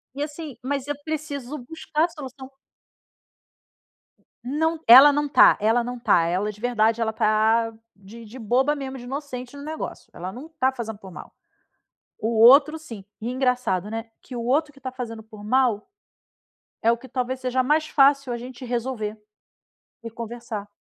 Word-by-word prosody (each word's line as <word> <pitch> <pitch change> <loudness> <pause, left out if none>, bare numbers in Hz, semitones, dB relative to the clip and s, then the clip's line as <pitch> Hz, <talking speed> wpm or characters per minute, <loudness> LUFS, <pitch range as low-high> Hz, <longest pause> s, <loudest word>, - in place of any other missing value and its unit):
E 285 - -2
assim, 295 -2 -7
mas 275 +1 -3
eu 290 - -2
preciso 300 -3 -5
buscar 315 0 -1
a - - -5
solução. 265 -5 -10 2.0
Não 320 +6 0
t 320 - -28
ela 265 +5 +10
não 295 +1 0
tá 285 - +6
ela 225 +3 +2
não 245 +1 -5
tá 175 -7 +3
ela, 185 +5 -1
de 210 0 -17
verdade, 230 -1 +1
ela 220 -1 +1
tá 220 +1 +2 0.2
de 205 +4 -13
de 230 +5 -11
boba 255 +6 +1
mesmo, 270 -2 -6
de 245 - -10
inocente 255 -1 -6
no 280 - -9
negócio. 310 +1 -6
Ela 185 +2 -6
não 255 +9 -9
tá 260 +1 +3
fazendo 225 -5 -6
por 190 -2 -12
mal. - - -11 0.9
O 215 - -2
outro, 275 +7 +7
sim. 230 -11 -10 0.2
E 230 - -3
engraçado, 250 -7 0
né, 225 +1 -5
que 255 - -10
o 235 - -4
outro 295 +5 +1
que 275 - -18
tá 260 -1 -6
fazendo 230 -3 -7
por 215 -1 -13
mal, 240 - +1 0.9
é 225 - +4
o 235 - +2
que 260 +3 -14
talvez 255 +1 -3
seja 255 0 0
mais 305 +4 +2
fácil 275 -3 +3
a - - -2
gente 250 +1 -9
resolver 235 -3 -3 0.8
e 230 - -7
conversar. 230 -2 -6
250 Hz, 175 wpm, -24 LUFS, 225-280 Hz, 2.0 s, ela